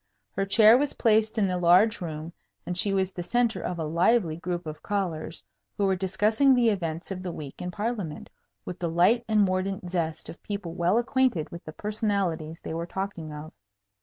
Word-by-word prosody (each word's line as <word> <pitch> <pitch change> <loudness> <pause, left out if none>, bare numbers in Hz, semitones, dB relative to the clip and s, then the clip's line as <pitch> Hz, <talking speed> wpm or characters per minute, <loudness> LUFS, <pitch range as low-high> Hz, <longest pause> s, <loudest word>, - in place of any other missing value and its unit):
Her 195 0 -2
chair 220 +3 +7
was 290 0 0
placed 220 0 +2
in 210 - +3
the 180 -1 -1
large 185 +6 +4
room, 160 0 -6 0.3
and 180 - -3
she 200 +3 +2
was 190 -1 +1
the 180 - -6
centre 235 +5 +1
of 180 - -3
a 165 - -2
lively 170 +3 +2
group 175 +1 -4
of 155 -1 -7
callers 180 -6 -3 0.3
who 200 - +1
were 190 -1 +2
discussing 210 +8 +3
the 240 -2 +4
events 170 -4 -3
of 185 -1 -4
the 185 -1 -4
week 150 -4 -8
in 180 - -3
Parliament, 205 -4 -4 0.3
with 180 - -6
the 170 - -1
light 180 +9 +3
and 215 -1 +3
mordant 185 -1 -1
zest 165 -3 -2
of 165 - -9
people 200 -5 -5
well 175 +4 +2
acquainted 240 -8 +1
with 170 - -9
the 155 - -8
personalities 195 -7 -2
they - - -6
were 165 +1 -3
talking 190 -5 -5
of. 150 +1 -9
185 Hz, 195 wpm, -27 LUFS, 170-215 Hz, 0.3 s, chair